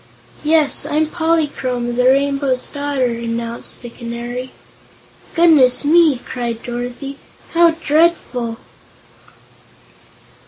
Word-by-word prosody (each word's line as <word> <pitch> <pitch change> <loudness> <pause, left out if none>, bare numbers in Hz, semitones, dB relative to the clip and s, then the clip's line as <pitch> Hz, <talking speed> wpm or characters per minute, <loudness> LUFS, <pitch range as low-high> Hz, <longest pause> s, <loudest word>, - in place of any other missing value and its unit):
"Yes; 310 -1 +3
I'm 310 +1 +1
Polychrome, 295 -7 -1
the 250 +1 +1
Rainbow's 275 -1 +2
Daughter," 285 -2 -2
announced 235 0 -4
the 240 - -8
Canary. 240 +2 -6 0.9
"Goodness 300 -7 +5
me!" 315 -2 +5
cried 240 -2 -5
Dorothy. 245 +3 -6 0.3
"How 340 0 +6
dreadful." 305 -7 0
265 Hz, 85 wpm, -18 LUFS, 240-305 Hz, 0.9 s, How